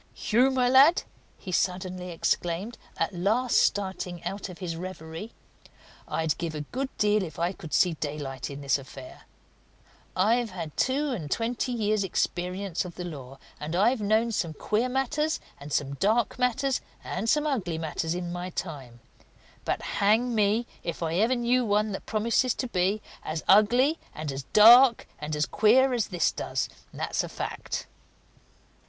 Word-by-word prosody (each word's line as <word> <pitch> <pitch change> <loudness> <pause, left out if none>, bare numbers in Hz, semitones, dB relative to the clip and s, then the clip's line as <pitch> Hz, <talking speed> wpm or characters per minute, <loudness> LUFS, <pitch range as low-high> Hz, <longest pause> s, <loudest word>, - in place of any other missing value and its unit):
"Hugh, 245 +5 +3
my 255 -2 +2
lad!" 275 +7 +6 0.3
he 185 - -8
suddenly 180 0 -1
exclaimed, 175 +5 -2 0.2
at - - -1
last 220 +8 +1
starting 190 -3 -1
out 195 0 -4
of 180 - -9
his 175 -3 -4
reverie. 170 +3 -7 0.8
"I'd 160 -2 -1
give 165 -2 -3
a 150 - -3
good 260 - -4
deal 210 0 +3
if 160 -5 -6
I 170 +1 0
could 165 -5 -10
see 180 -3 +3
daylight 145 -4 -5
in 140 0 -7
this 140 0 +1
affair! 135 -1 -12 0.9
I've 225 +5 +2
had 170 -5 -7
two 280 +2 +1
and 170 - -4
twenty 235 - -1
years' 215 -3 +1
experience 180 0 -2
of 180 -2 -9
the 180 - -5
law, 135 -6 -8 0.2
and 155 +3 -4
I've 220 +6 +3
known 220 +3 +2
some 170 -7 -1
queer 225 +9 0
matters, 290 +4 0 0.2
and 145 +1 -9
some 140 -1 0
dark 215 - +1
matters, 255 +2 +1 0.2
and 205 +5 -3
some 300 +3 +3
ugly 200 - -1
matters 160 +1 -2
in 175 -1 -4
my 180 +1 -4
time; 135 -10 -7 0.6
but - - -1
hang 220 +5 +2
me 215 +2 +2 0.2
if 170 0 -4
I 160 0 -1
ever 225 +6 +3
knew 245 +1 +2
one 210 -1 +1
that 195 - -6
promises 230 +3 +1
to 255 - -3
be 195 0 0 0.2
as 155 0 -4
ugly 245 - +5 0.2
and 155 -2 -4
as 135 0 -4
dark 235 +3 +8
and 150 0 -3
as 150 0 +1
queer 255 +5 +4
as 235 -4 0
this 175 -3 +1
does - - -3 0.2
that's - - -2
a - - -6
fact!" - - -5
195 Hz, 165 wpm, -27 LUFS, 165-235 Hz, 0.9 s, dark